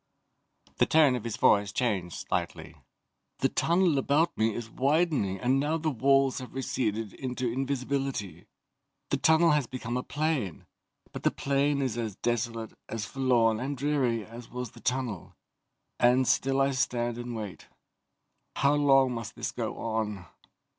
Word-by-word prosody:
The - - +3
tone 150 -5 +5
of 120 - -4
his 115 -3 -3
voice 100 -1 +4
changed 100 -8 -1
slightly. - - -3 0.6
"The - - +1
tunnel 170 -3 +2
about 145 +5 +2
me 110 +1 +2
is 115 +1 -5
widening 135 - +1
and 130 +2 +2
now 150 +3 0
the 160 -1 -1
walls 135 +1 +3
have 130 0 -10
receded 115 -5 -2
into 130 -1 -4
invisibility. 135 - -3 0.6
The - - +2
tunnel 160 +1 +4
has 150 -4 +2
become 120 -1 -4
a - - -1
plain, 145 - -2 0.5
but - - -7
the - - +3
plain 140 0 0
is 120 -3 -2
as 110 -4 -3
desolate, 115 -1 -2 0.2
as 110 -1 -3
forlorn 120 -3 +2
and 135 +3 -3
dreary 130 -6 0
as 115 +1 -11
was 125 -2 -5
the 120 - -15
tunnel, 125 -7 -3 0.6
and 125 +1 +4
still 135 +1 +2
I 135 0 +3
stand 120 -3 -1
and 120 0 -5
wait. 105 -5 -7 0.9
How 140 +1 +3
long 135 -3 +4
must 115 -3 -5
this - - -3
go - - -4
on?" 110 -4 -3
125 Hz, 155 wpm, -28 LUFS, 115-140 Hz, 0.9 s, tone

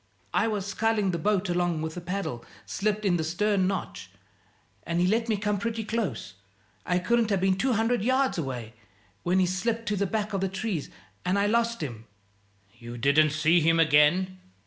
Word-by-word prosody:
I - - +2
was 210 -3 -2
sculling 210 0 0
the 170 - -2
boat 200 +2 +1
along 175 -2 0
with 160 0 -4
a 175 - -5
paddle 175 -9 -4 0.2
slipped 210 +1 -1
in 180 -3 +3
the 160 - -1
stern 190 +4 +1
notch, 190 - -4 0.7
and 170 +8 -2
he 175 - +3
let 225 +5 +1
me 215 - +2
come 210 0 -1
pretty 230 +1 -2
close 205 - -3 0.5
I 180 - +2
couldn't 230 +5 +1
have 200 -2 +1
been 190 0 +2
two 255 +6 +1
hundred 225 +1 +1
yards 255 -4 +1
away 125 -6 -5 0.5
when 180 +2 +1
he 185 - +4
slipped 225 +6 -1
to 210 - 0
the 200 0 0
back 210 +1 -2
of 195 - -1
the 195 - 0
trees, 190 -4 -3 0.3
and 180 +2 +1
I 200 - +2
lost 230 +2 +1
him." 115 -6 -6 0.7
"You 120 0 -8
didn't 140 +5 +4
see 155 +3 +3
him 165 +1 +3
again?" 165 +5 +3
190 Hz, 190 wpm, -27 LUFS, 165-215 Hz, 0.7 s, he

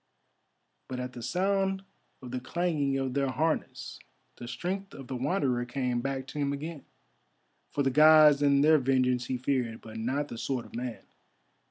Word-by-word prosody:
But 130 -1 -5
at 125 0 -5
the 120 - -8
sound 195 +6 0 0.4
of 125 - -8
the 130 - -2
clanging 145 0 -1
of 135 -1 -2
their 140 0 +1
harness 155 +4 -2 0.4
the 120 - -8
strength 195 +8 -4
of 135 - -9
the 130 - -5
Wanderer 130 -2 0
came 125 -1 -1
back 135 0 -3
to 150 - -6
him 140 -1 0
again, 150 +1 -6 0.8
for 145 - -1
the 135 - +2
Gods 150 0 +7
and 140 -1 +4
their 155 0 +6
vengeance 125 -2 +1
he 130 - -1
feared, 125 -3 -1
but 110 0 -9
not 130 +6 -1
the 115 - -7
sword 130 -3 -2
of - - -13
man. 120 -1 -5
135 Hz, 175 wpm, -29 LUFS, 125-150 Hz, 0.8 s, Gods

